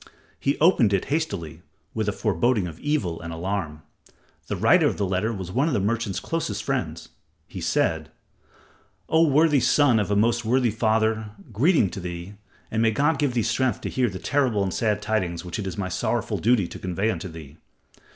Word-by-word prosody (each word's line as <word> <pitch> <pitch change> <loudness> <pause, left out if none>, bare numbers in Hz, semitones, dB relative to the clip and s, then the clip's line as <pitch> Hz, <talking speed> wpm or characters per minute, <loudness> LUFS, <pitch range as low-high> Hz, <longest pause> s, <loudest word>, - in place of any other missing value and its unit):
He 140 - 0
opened 145 - +4
it 95 - +1
hastily, 100 - -3 0.3
with 110 -2 -1
a - - +1
foreboding 105 +1 +1
of 85 -1 -8
evil 105 - -1
and 85 0 -6
alarm. 85 -3 -4 0.6
The - - -2
writer - - +4
of - - -2
the 100 - 0
letter 95 +4 0
was 95 -5 -6
one 135 +9 +1
of 160 - 0
the - - +2
merchant's 105 0 -1
closest 105 -11 -3
friends. - - -3 0.4
He - - -8
said: 80 -2 0 1.0
"O 160 +1 +4
worthy 150 0 +4
son 130 -3 +4
of 105 - -1
a 100 - +1
most 115 +3 +2
worthy 120 +1 +2
father, 110 0 +1 0.2
greeting 130 - +3
to - - -6
thee, 90 +1 -6 0.4
and 110 - 0
may 115 - +4
God 140 +6 +1
give 140 -4 0
thee 115 - +2
strength 120 0 0
to - - -4
hear 125 -2 +1
the 95 - -6
terrible 125 -3 +1
and 95 -2 -2
sad 105 -2 0
tidings 90 -6 -1
which 90 +4 -5
it 100 - -3
is 95 - -5
my 100 -2 -2
sorrowful - - -1
duty 110 -5 +2
to - - -9
convey 95 +4 -1
unto 100 - -5
thee. 80 -2 -11
105 Hz, 195 wpm, -24 LUFS, 95-125 Hz, 1.0 s, opened